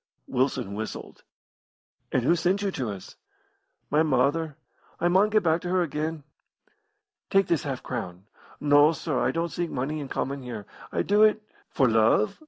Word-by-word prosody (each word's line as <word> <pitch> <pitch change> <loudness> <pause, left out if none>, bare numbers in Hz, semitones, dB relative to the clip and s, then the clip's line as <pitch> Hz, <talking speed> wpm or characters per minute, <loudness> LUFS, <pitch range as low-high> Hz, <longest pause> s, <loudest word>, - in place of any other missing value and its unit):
Wilson 130 -6 -1
whistled. 110 +2 -6 0.9
"And 125 - +1
who 165 +7 +4
sent 180 +4 0
you 200 - 0
to 130 -9 -3
us?" 100 -3 -8 0.8
"My 150 +2 +4
mother. 150 +1 +1 0.4
I 175 - +2
maun 190 +4 +4
get 215 -1 +2
back 165 0 +2
to 180 - -5
her 185 0 +2
again." 155 0 -3 1.1
"Take 195 -1 +4
this 170 -3 +1
half 135 -3 -4
crown." 90 +2 -6 0.3
"No, 145 +2 +5
sir, 155 -4 -2
I - - +1
don't 170 +1 -1
seek 175 -1 -2
money 140 +4 -3
in 145 - -5
comin' 140 +1 -3
here. 120 -5 -7 0.3
I - - 0
do 205 +1 +3
it 215 0 +4
" - - -33
"For 130 - +4
love?" 110 -1 +3
150 Hz, 175 wpm, -26 LUFS, 130-175 Hz, 1.1 s, No